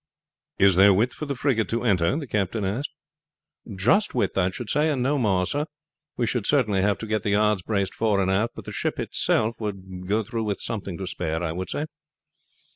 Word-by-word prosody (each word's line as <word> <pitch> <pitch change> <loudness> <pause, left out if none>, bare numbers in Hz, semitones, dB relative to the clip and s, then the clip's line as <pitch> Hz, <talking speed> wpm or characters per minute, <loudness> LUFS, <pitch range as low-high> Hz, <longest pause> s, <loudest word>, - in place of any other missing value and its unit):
"Is 95 -2 +5
there 100 0 +7
width 115 +6 +2
for 155 - -6
the 140 - -2
frigate 125 -4 0
to 115 +1 -1
enter?" 90 - +2
the 155 - -4
captain 105 -2 -1
asked. 110 +10 -2 0.9
"Just 130 - +2
width, 120 - 0
I 90 -1 +2
should 110 +5 -6
say, 150 +2 +2
and 135 -5 0
no 140 +2 +1
more, 95 -6 +2
sir. 145 - -1 0.5
We 120 - +1
should 115 -2 -1
certainly 110 -9 +2
have 100 0 +2
to - - -4
get 110 -1 -1
the 105 - -2
yards 105 -1 +2
braced 100 0 -1
fore 110 -3 +1
and 95 -1 +1
aft, 105 +5 0
but - - -9
the - - -6
ship - - -2
herself 110 +1 0
would 95 -3 -6
go 105 +3 +1
through 115 +1 -3
with 100 -2 -2
something 100 -6 -4
to 95 - -5
spare, 80 -2 -3
I 80 -1 -2
should 95 +1 -4
say." 150 - -2
105 Hz, 215 wpm, -25 LUFS, 95-120 Hz, 0.9 s, there